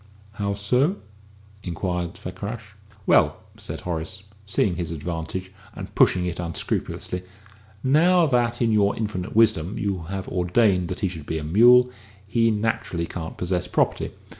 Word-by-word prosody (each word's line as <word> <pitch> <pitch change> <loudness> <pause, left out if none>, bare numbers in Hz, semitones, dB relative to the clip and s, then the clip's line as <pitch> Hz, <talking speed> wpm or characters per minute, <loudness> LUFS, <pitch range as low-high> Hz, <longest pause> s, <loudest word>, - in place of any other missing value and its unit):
"How 100 -1 -2
so?" 125 - +2 0.7
inquired 90 -1 -3
Fakrash. 100 +4 -7 0.3
"Well," - - +4 0.2
said - - -6
Horace, 90 +2 -4 0.2
seeing 95 -2 +1
his 85 -2 -3
advantage, 85 +3 -4 0.2
and - - -8
pushing 90 -1 +4
it 90 -1 -3
unscrupulously, 90 +1 -3 0.6
"now, 170 +6 +5
that, 120 -3 +1
in 115 - +2
your 105 -1 +3
infinite 105 -2 -3
wisdom, 110 -5 +3
you 100 -3 -1
have 95 -1 -4
ordained 90 0 +2
that - - -5
he 100 - +2
should 80 -5 -7
be 80 - -2
a 80 - -4
mule, 120 +9 +6 0.3
he 115 +3 +2
naturally 105 -6 -1
can't 80 -2 -6
possess 90 0 -1
property. - - 0
95 Hz, 140 wpm, -24 LUFS, 90-115 Hz, 0.7 s, mule